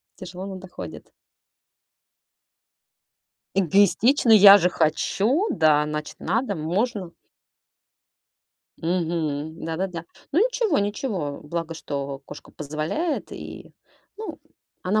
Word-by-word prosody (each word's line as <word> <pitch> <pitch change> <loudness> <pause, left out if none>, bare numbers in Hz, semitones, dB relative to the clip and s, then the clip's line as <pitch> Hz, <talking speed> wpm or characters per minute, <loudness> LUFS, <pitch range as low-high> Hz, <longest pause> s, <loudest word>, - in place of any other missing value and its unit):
тяжело, 185 +1 -8
но 190 - -6
доходит. 185 0 -10 2.5
Эгоистично. 205 - +3
Я 205 -1 +10
же 180 0 +2
хочу. 195 - +1
Да, 155 - +3
значит, 150 0 -5
надо, 230 -3 0
можно. 185 +4 -2 1.7
Мгм, 160 -3 -2
да-да-да. 170 +1 -3 0.3
Ну, 325 - +3
ничего, 460 -6 +2
ничего. 200 - -2
Благо, 165 +1 -4
что 140 -3 -5
кошка - - -11
позволяет, 155 - -3
и, - - -9 0.4
ну, 375 -8 -7 0.4
она 210 +4 +1
180 Hz, 90 wpm, -24 LUFS, 155-215 Hz, 2.5 s, Я